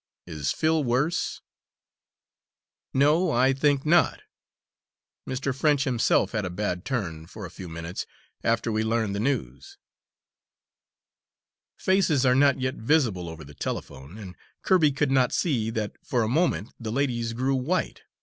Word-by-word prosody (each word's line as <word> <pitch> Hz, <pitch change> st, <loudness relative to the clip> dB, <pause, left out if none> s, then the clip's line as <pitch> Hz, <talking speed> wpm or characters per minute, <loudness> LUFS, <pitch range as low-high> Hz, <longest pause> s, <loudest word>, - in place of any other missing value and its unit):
Is 75 Hz, -5 st, -3 dB
Phil 160 Hz, -1 st, +1 dB
worse?" 135 Hz, +8 st, 0 dB, 1.5 s
"No, 150 Hz, +6 st, +3 dB
I 130 Hz, -1 st, +3 dB
think 140 Hz, +1 st, +1 dB
not. 170 Hz, +3 st, +3 dB, 1.1 s
Mr. 130 Hz, 0 st, -2 dB
French 145 Hz, 0 st, +2 dB
himself 125 Hz, -3 st, +2 dB
had 110 Hz, -3 st, -1 dB
a 90 Hz, -, -3 dB
bad 90 Hz, -1 st, -3 dB
turn, 85 Hz, -11 st, -3 dB
for 105 Hz, +2 st, -9 dB
a 90 Hz, -, -9 dB
few 90 Hz, 0 st, -9 dB
minutes, 85 Hz, +2 st, -6 dB, 0.4 s
after 115 Hz, 0 st, +1 dB
we 110 Hz, 0 st, 0 dB
learned 110 Hz, -2 st, 0 dB
the 100 Hz, -, -2 dB
news." 105 Hz, -, -3 dB, 2.0 s
Faces 180 Hz, -8 st, +2 dB
are 125 Hz, -, +5 dB
not 140 Hz, +1 st, +4 dB
yet 130 Hz, 0 st, -2 dB
visible 110 Hz, -, +1 dB
over 80 Hz, -1 st, -9 dB
the 75 Hz, 0 st, -13 dB
telephone, 70 Hz, +5 st, -6 dB
and 95 Hz, -4 st, -9 dB, 0.3 s
Kirby 170 Hz, -6 st, +4 dB
could 135 Hz, 0 st, 0 dB
not 130 Hz, -2 st, +3 dB
see 120 Hz, -10 st, 0 dB
that 110 Hz, -3 st, -2 dB
for 125 Hz, -5 st, 0 dB
a -, -, 0 dB
moment 140 Hz, -, 0 dB
the 110 Hz, -3 st, -4 dB
lady's 120 Hz, -3 st, -1 dB
grew 130 Hz, +3 st, 0 dB
white. 135 Hz, +8 st, -1 dB
125 Hz, 145 wpm, -26 LUFS, 100-140 Hz, 2.0 s, are